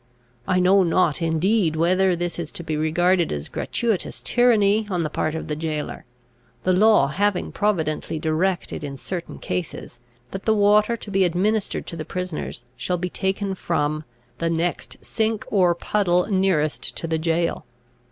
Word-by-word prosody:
I 185 -1 +2
know 190 +2 +5
not 175 -2 +2
indeed 165 +2 +1
whether 185 +3 +3
this 175 0 -3
is 165 -3 -5
to 170 - -5
be 160 -2 -2
regarded 170 +3 +2
as 75 0 -4
gratuitous 225 -6 -2
tyranny 220 -3 +3
on 180 -3 0
the 155 - -3
part 155 +1 -1
of 160 - -5
the 150 - -2
jailor; 155 -1 -4 0.6
the 185 - +2
law 210 -7 +5
having 195 +5 0
providently 160 -8 -1
directed, 160 +2 -1
in 140 -1 -5
certain 175 +5 -6
cases, 155 -8 -5 0.3
that 195 - -6
the 220 - +3
water 210 +2 +4
to 210 - -9
be 195 -1 +3
administered 195 +5 0
to - - -7
the 160 - -4
prisoners 180 -8 -5
shall 180 +7 -2
be 180 0 -3
taken 195 +1 -1
from 155 -4 -1 0.4
"the 165 - 0
next 170 +1 -2
sink 220 -1 -1
or 180 -4 +4
puddle 180 -1 +1
nearest 185 -6 +1
to - - -4
the 160 -1 -1
jail." 165 -3 -1
180 Hz, 160 wpm, -23 LUFS, 160-195 Hz, 0.6 s, know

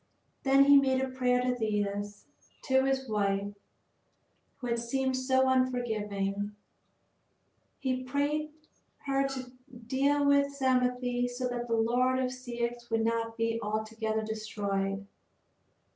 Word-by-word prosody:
Then 270 0 +5
he 285 0 +8
made 265 -1 +3
a 265 0 -1
prayer 250 -1 +1
to 250 0 +1
Thetis, 205 -2 -2 0.4
to 265 -1 +3
his 265 0 0
wife 200 -2 0 1.0
who 255 - -8
had 235 -1 0
seemed 260 +2 -1
so 260 0 +2
unforgiving. 210 -6 0 1.2
He 255 -2 -1
prayed 290 +4 -1 0.5
her 275 0 +1
to 260 -2 -6 0.3
deal 280 +4 +2
with 280 0 +3
Psamathe 250 -2 +1
so 250 +1 -3
that 240 0 -3
the 230 - +1
land 250 +3 +2
of 255 -1 0
Ceyx 240 -1 -4
would 225 -1 +1
not 230 0 -1
be 230 0 0
altogether 220 +1 -2
destroyed. 200 -2 -2
245 Hz, 125 wpm, -30 LUFS, 220-260 Hz, 1.2 s, he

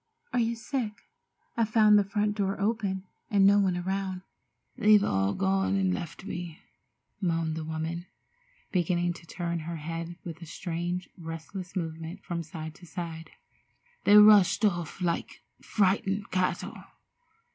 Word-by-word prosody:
Are - - +2
you 230 0 +1
sick? 230 -1 -3 0.6
I 230 - +2
found 215 -1 +5
the - - +3
front 205 +1 0
door 195 -1 -1
open, 200 -3 0 0.3
and 200 -3 +4
no 200 +1 +6
one 185 -3 +2
around." 190 0 -2 0.5
"They've 210 -1 +6
all 95 - +1
gone 195 0 +1
and 190 -2 +2
left 170 +1 -6
me," 175 -4 -5 0.6
moaned 165 -3 0
the 160 - -4
woman, 160 +3 -4 0.6
beginning 175 -1 +1
to 170 -1 -14
turn 170 0 -3
her 165 +2 -5
head 165 +2 -5
with 165 -1 -7
a 170 - -8
strange, 175 +2 -3
restless 165 +3 -7
movement 165 +1 -4
from 170 -1 -3
side 160 -1 -7
to 175 - -14
side. 165 -2 -6 0.7
"They 205 +1 +7
rushed 210 +1 +7
off 175 -2 -1
like 170 -1 -2 0.2
frightened 200 0 +1
cattle. 185 0 -1
180 Hz, 145 wpm, -28 LUFS, 165-200 Hz, 0.7 s, They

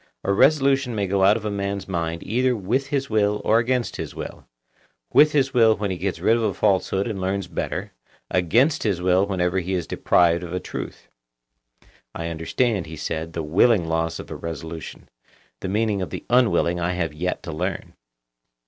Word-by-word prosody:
A 100 - +1
resolution 135 0 +3
may 100 -2 0
go 95 0 +1
out 100 +3 +5
of 110 - -8
a 105 - -1
man's 100 0 -3
mind 85 -3 -3
either 125 +3 +1
with 120 +7 -1
his 140 -1 -1
will 105 -2 +1
or 110 +1 +4
against 125 +1 -1
his - - -6
will; - - -8 0.7
with 150 +1 +7
his 135 -2 +1
will 115 -3 +5
when 100 -1 -2
he 95 - -3
gets 95 0 -2
rid 115 - +3
of 120 - 0
a 105 -4 0
falsehood 95 -1 +1
and 105 -5 -4
learns 95 +1 -1
better, - - -4 0.4
against 115 - +2
his 100 -5 0
will 90 +2 +2
whenever 90 -1 0
he 95 +1 -2
is 90 -3 -2
deprived 85 -1 +2
of 85 - -7
a 90 - -1
truth. - - -7 1.1
I 85 0 -4
understand, 85 +4 -1
he 80 - -8
said, 80 +2 -4
the 80 - -3
willing 90 +4 +3
loss 80 0 -1
of - - -9
a - - -4
resolution; 80 0 -7 0.5
the 95 - -4
meaning 105 0 0
of 90 - -3
the - - -7
unwilling 115 -8 +3
I 85 +1 -1
have 85 -4 -2
yet 90 +4 -3
to 80 - -6
learn. 90 +3 -4
95 Hz, 195 wpm, -23 LUFS, 85-115 Hz, 1.1 s, with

